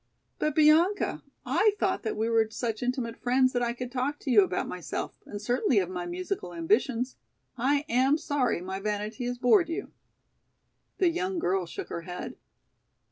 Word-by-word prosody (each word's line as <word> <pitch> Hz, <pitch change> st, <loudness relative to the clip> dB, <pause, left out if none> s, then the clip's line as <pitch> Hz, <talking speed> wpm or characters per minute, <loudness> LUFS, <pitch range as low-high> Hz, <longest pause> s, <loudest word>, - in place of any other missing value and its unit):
"But, 305 Hz, -1 st, 0 dB
Bianca, 320 Hz, +6 st, +4 dB, 0.2 s
I 425 Hz, -1 st, +3 dB
thought 375 Hz, -1 st, +1 dB
that 220 Hz, -, -3 dB
we 220 Hz, +1 st, 0 dB
were 225 Hz, -1 st, +3 dB
such 220 Hz, -1 st, -3 dB
intimate 245 Hz, -2 st, -2 dB
friends 255 Hz, +1 st, +3 dB
that 245 Hz, -, +1 dB
I 235 Hz, -1 st, 0 dB
could 250 Hz, 0 st, -6 dB
talk 265 Hz, +3 st, -1 dB
to 270 Hz, -, -2 dB
you 215 Hz, -4 st, +8 dB
about 185 Hz, -1 st, -2 dB
myself, 180 Hz, -2 st, -4 dB
and 205 Hz, -, -6 dB
certainly 240 Hz, +2 st, +1 dB
of 185 Hz, -2 st, +1 dB
my 180 Hz, -1 st, -4 dB
musical 180 Hz, 0 st, -4 dB
ambitions. 230 Hz, +9 st, +1 dB, 0.4 s
I 280 Hz, +4 st, +1 dB
am 260 Hz, +5 st, +3 dB
sorry 280 Hz, -, 0 dB
my 190 Hz, +1 st, -4 dB
vanity 210 Hz, +4 st, -3 dB
has 245 Hz, 0 st, -2 dB
bored 315 Hz, +8 st, +4 dB
you." 365 Hz, +5 st, -4 dB, 1.1 s
The 365 Hz, -, +4 dB
young 370 Hz, +2 st, -2 dB
girl 190 Hz, -, 0 dB
shook -, -, -7 dB
her 170 Hz, -, -4 dB
head. 180 Hz, +1 st, -6 dB
245 Hz, 175 wpm, -28 LUFS, 205-285 Hz, 1.1 s, you